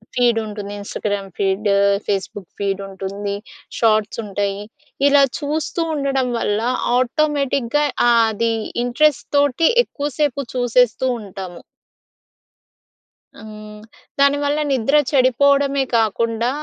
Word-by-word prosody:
Feed 240 -2 +3
ఉంటుంది. 205 -1 -7
Instagram 200 -1 -4
feed, 195 +2 0 0.4
Facebook 195 -1 -3
feed 200 -1 -1
ఉంటుంది. 200 +1 -5 0.4
Shots 220 -1 +1
ఉంటాయి. 200 0 -2 0.5
ఇలా 285 0 +5 0.2
చూస్తూ 310 +3 -2
ఉండడం 270 -3 0
వల్ల 210 -1 0 0.4
ఆటోమేటిక్‍గా 280 0 0 0.2
ఆ - - +5 0.2
ఆది 225 +1 0 0.3
ఇంట్రెస్ట్‌తోటి 285 +2 +2 0.2
ఎక్కువసేపు 290 - -2
చూసేస్తూ 245 0 +2 0.2
ఉంటాము. 190 -3 -9 1.8
హ్మ్. 215 -1 -11 0.4
దాని 280 +1 +4
వల్ల 290 +1 0
నిద్ర 270 +2 +1
చెడిపోవడమే 275 +1 +3
కాకుండా, 230 +2 0
235 Hz, 95 wpm, -19 LUFS, 205-280 Hz, 1.8 s, ఇలా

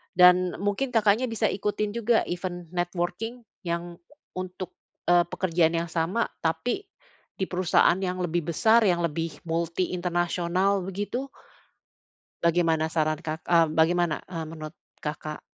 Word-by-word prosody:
Dan 180 0 +6
mungkin 205 +6 -1
Kakaknya 220 +2 +4
bisa 225 -3 0
ikutin 210 +1 -1
juga 230 0 +3
event 175 -1 -4
networking 175 +7 -3 0.2
yang 170 0 -3 0.4
untuk, 185 0 -6 0.3
eee, 175 0 +5
pekerjaan 170 -2 +1
yang 165 0 -1
sama 170 +8 0
tapi 165 - -1 0.5
di 190 - -3
perusahaan 180 0 +3
yang 185 -1 -2
lebih 170 -1 -1
besar 225 +4 +5
yang 175 -2 +3
lebih 165 -2 -3
multi 170 +2 -1
international 180 +2 0
begitu? 205 +7 -3 1.2
Bagaimana 165 -2 +3
saran 155 -2 +1
Kak 160 0 -5
eee 170 -1 +5
bagaimana, 165 0 +2
eee, 165 -3 -4
menurut 155 0 -8 0.2
Kakak? 150 0 -5
175 Hz, 125 wpm, -26 LUFS, 165-190 Hz, 1.2 s, Dan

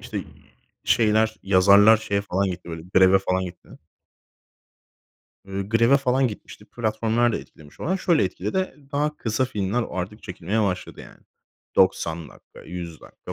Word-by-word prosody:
işte, - - -5 0.6
şeyler 110 0 +2
yazarlar 100 +3 +6
şeye 100 -2 -2
falan 100 0 -1
gitti, 90 -1 -8
böyle, 80 -1 -6
greve 95 +1 +6
falan 95 -1 -1
gitti 90 0 -10 1.8
eee, 95 0 -4
greve 115 +5 +4
falan 130 -1 +1
gitmişti. 105 -1 -11
Platformlar 115 +1 0
da - - -1
etkilemiş 75 -2 -15
olan. 185 +4 0
Şöyle 170 - +2
etkiledi. 105 - -3 0.2
Daha 150 +1 -1
kısa 110 +3 -1
filmler 110 0 -2
artık 95 +5 -5
çekilmeye 95 +4 -2
başladı 90 -3 -3
yani. - - -14 0.6
90 80 -2 +1
dakika, - - -17
100 85 -1 -8
dakika - - -11
105 Hz, 140 wpm, -23 LUFS, 95-115 Hz, 1.8 s, yazarlar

